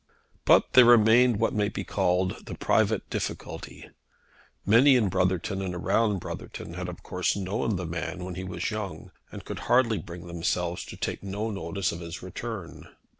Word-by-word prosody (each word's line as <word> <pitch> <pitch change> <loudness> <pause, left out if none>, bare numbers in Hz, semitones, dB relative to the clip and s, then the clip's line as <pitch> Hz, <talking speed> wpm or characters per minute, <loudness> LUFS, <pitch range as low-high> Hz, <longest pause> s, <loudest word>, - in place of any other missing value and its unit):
But - - +5
there 125 -1 +9
remained 120 0 +6
what 115 - +1
may 105 -1 +1
be - - -5
called 90 +1 0
the - - -5
private - - +1
difficulty. - - -5 0.8
Many 125 +7 +6
in 110 -6 +3
Brotherton 95 +1 0
and 90 -2 -3
around 100 +4 +1
Brotherton 85 - -7
had 90 +1 -5
of 90 - -9
course 90 -1 -1
known 100 +2 -1
the 90 0 -3
man 85 +2 -4
when 90 - -5
he 90 +2 -5
was 90 +2 -3
young, 100 -7 -5 0.2
and - - -9
could - - -6
hardly 120 -3 +4
bring 85 -2 -9
themselves 85 0 -2
to - - -10
take - - -3
no 100 +3 -3
notice 100 -2 -2
of 85 - -6
his 85 0 -7
return. 95 0 -7
95 Hz, 175 wpm, -27 LUFS, 90-110 Hz, 0.8 s, there